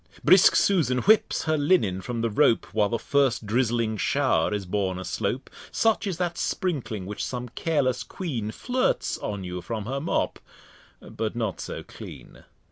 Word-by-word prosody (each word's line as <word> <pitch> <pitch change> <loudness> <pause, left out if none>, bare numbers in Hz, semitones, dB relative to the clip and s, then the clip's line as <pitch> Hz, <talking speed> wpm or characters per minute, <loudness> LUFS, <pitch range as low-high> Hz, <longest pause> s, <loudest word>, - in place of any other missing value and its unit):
Brisk 185 0 +7
Susan 160 -10 +3
whips 215 0 +3
her 155 -1 +1
Linen 145 - +2
from 120 +2 -4
the 115 - +1
Rope, 115 +2 +3
While 105 -1 +2
the 115 - 0
first 135 -3 +1
drizzling 115 0 0
Show'r 80 -1 +1
is 105 -2 -2
born 95 0 -1
aslope, 105 +7 -3 0.2
Such 225 -2 +1
is 185 -4 -2
that 175 -1 -2
Sprinkling 120 - -2
which 105 +2 -5
some 125 -1 -4
careless 130 -2 0
Quean 130 - -4
Flirts 255 - -1
on 100 -2 -4
you 90 0 -5
from 110 +1 -4
her 135 +4 -2
Mop, 165 - -1 0.6
but 110 0 -4
not 110 -5 -2
so - - -6
clean. - - -12
120 Hz, 160 wpm, -26 LUFS, 105-155 Hz, 0.6 s, Brisk